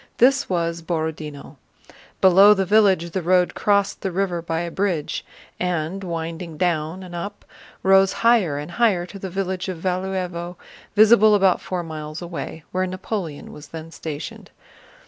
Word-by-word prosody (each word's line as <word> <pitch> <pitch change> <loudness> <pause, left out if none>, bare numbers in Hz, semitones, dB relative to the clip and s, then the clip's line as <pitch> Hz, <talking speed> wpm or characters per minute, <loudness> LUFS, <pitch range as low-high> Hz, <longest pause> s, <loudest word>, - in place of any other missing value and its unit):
This 270 +3 +4
was 170 -2 -1
Borodinó. 160 -3 -4 0.6
Below 195 +3 +7
the 195 -1 0
village 190 -4 +3
the 190 - -2
road 180 +1 +2
crossed 200 -1 +1
the 190 - -2
river 180 -2 -1
by 165 0 -2
a 170 -1 -4
bridge 180 -6 -1 0.4
and, 180 +1 -2
winding 165 -1 -5
down 170 +1 -1
and 180 -1 -10
up, 200 +4 -6 0.4
rose 195 0 +5
higher 210 -11 +4
and 150 +4 -6
higher 200 -5 +2
to 195 +2 -10
the 190 - -5
village 190 0 -3
of 185 - -4
Valúevo 180 -1 -3 0.4
visible 215 0 +7
about 195 -2 +3
four 180 -2 -3
miles 155 -1 -6
away, 170 -2 -6
where 185 0 0
Napoleon 185 -4 -5
was 150 0 -11
then 165 +1 -9
stationed. 155 -3 -7
180 Hz, 150 wpm, -22 LUFS, 165-195 Hz, 0.6 s, Below